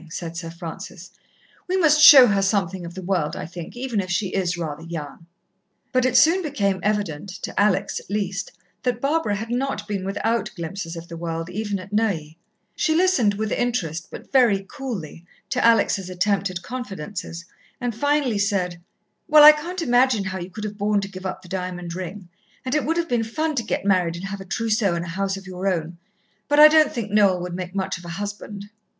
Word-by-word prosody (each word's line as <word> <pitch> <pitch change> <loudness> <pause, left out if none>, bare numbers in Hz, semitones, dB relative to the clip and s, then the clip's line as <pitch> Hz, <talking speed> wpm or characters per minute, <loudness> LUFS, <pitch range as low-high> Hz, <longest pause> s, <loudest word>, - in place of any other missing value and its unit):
said 165 0 -6
Sir 170 -1 -5
Francis. 175 +1 -9 0.6
"We 370 +1 0
must 310 -4 +4
show 285 -4 +11
her 200 -4 +2
something 190 -3 0
of 170 - -10
the 190 - -7
world, 175 -5 -1
I - - -5
think, 175 +6 -9
even 245 -5 -1
if 185 - -7
she 185 +2 0
is 180 -2 -1
rather 155 -3 -4
young." 165 -1 -8 0.6
But 255 -1 +2
it 255 - +3
soon 340 +4 +5
became 205 - -1
evident, 200 -5 -2
to - - -3
Alex, 205 -2 +1
at - - -17
least, 200 0 -2 0.3
that 245 -2 -1
Barbara 275 -6 0
had 220 +3 -5
not 245 -4 -2
been 200 -3 -3
without 225 +4 -1
glimpses 170 0 -5
of 165 0 -8
the 170 - -8
world, 165 0 -4
even 205 +1 -2
at 190 +2 -10
Neuilly. 170 -8 -1 0.4
She 315 - +1
listened 320 - +3
with 215 +1 -3
interest, 175 -10 -1
but - - -11
very 230 -8 +4
coolly, 200 - -6 0.3
to 255 - 0
Alex' 230 -3 +4
attempted 185 0 -1
confidences, 195 -7 -6 0.3
and 245 -2 -2
finally 285 -2 +1
said, 185 -4 -1 0.5
"Well, 305 -1 +8
I 300 - +12
can't 335 +4 -4
imagine 245 -4 +3
how 190 -1 -4
you 175 +1 -6
could 210 +3 -8
have 210 0 -6
borne 205 0 +1
to 195 - -4
give 190 0 -6
up 190 - -6
the - - -13
diamond 180 -2 -4
ring, 185 +1 -7 0.4
and 255 - -2
it 300 - +1
would 325 +2 0
have 340 -1 0
been 240 -5 +1
fun 310 +8 -2
to 265 - 0
get 215 - -3
married 180 -4 +2
and 175 +3 -6
have 195 0 -5
a - - -9
trousseau 215 -2 0
and 170 0 -3
a - - -7
house 195 +2 -2
of 195 - -11
your 185 +1 -4
own. 170 -2 -2 0.5
But 290 0 +3
I 305 - +12
don't 310 -1 +5
think 220 -4 -4
Noel 200 -3 +4
would 180 0 -5
make 180 +1 -6
much 190 -2 -2
of 175 - -14
a - - -7
husband." 205 0 -6
200 Hz, 205 wpm, -23 LUFS, 180-240 Hz, 0.6 s, I